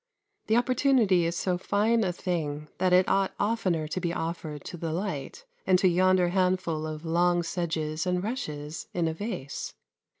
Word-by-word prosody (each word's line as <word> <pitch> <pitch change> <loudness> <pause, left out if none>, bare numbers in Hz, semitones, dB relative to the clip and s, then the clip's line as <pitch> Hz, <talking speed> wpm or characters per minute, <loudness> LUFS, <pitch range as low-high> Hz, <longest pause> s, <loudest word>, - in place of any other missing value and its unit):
The 220 - +3
opportunity 245 -7 +3
is 170 +1 -1
so 180 0 -1
fine 220 +4 +2
a 185 - +1
thing 150 -5 -3
that 185 0 +2
it 180 +1 +5
ought 195 0 +1
oftener 190 -7 0
to 185 - -3
be 170 -1 -1
offered 160 -3 -4
to - - -7
the 165 -1 -4
light 165 -6 -4 0.2
and 185 -1 +6
to 185 - +3
yonder 185 0 +3
handful 180 -4 0
of 155 +1 -6
long 175 +1 +2
sedges 160 -1 -2
and 180 0 0
rushes 150 - -4
in 170 -2 +1
a 160 - -1
vase. 175 - -5
175 Hz, 170 wpm, -28 LUFS, 160-190 Hz, 0.2 s, and